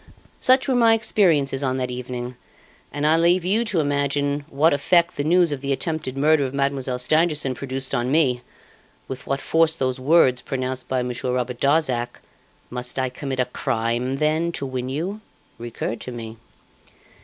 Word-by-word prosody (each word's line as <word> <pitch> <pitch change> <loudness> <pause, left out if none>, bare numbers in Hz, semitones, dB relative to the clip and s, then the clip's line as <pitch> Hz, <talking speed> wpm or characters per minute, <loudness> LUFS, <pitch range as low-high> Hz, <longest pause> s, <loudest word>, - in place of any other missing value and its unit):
"Such 260 +2 +4
were 265 - +2
my 230 -2 +5
experiences 165 -11 +2
on 130 -2 0
that 125 -1 -2
evening, 125 0 -5 0.6
and 145 0 -2
I 155 +2 +4
leave 170 +2 +3
you 210 +5 +2
to 205 -6 0
imagine 145 0 0
what 150 +3 +3
effect 170 +5 +2
the 145 - -2
news 170 +1 +3
of 140 -2 -3
the 140 0 -2
attempted 150 -2 -2
murder 150 +1 +3
of 135 0 -4
Mademoiselle 140 -2 -1
Stangerson 150 0 +1
produced 130 0 -3
on 125 0 0
me, 135 -6 +2 0.7
with 130 -1 -7
what 135 0 -1
force 160 +2 +2
those 130 -4 -2
words 130 -2 +4
pronounced 130 -1 -4
by 130 -1 0
Monsieur 125 0 -3
Robert 125 -1 -3
Darzac, 135 -5 +1 0.5
'Must 125 +1 -4
I 130 -1 0
commit 130 +1 -5
a 125 - +3
crime, 120 +1 -2
then, 155 +4 +1
to 140 - -2
win 130 -1 -4
you?' 180 +10 -4 0.4
recurred 120 -1 -5
to 125 - -6
me. 115 -2 -8
135 Hz, 170 wpm, -22 LUFS, 125-160 Hz, 0.7 s, my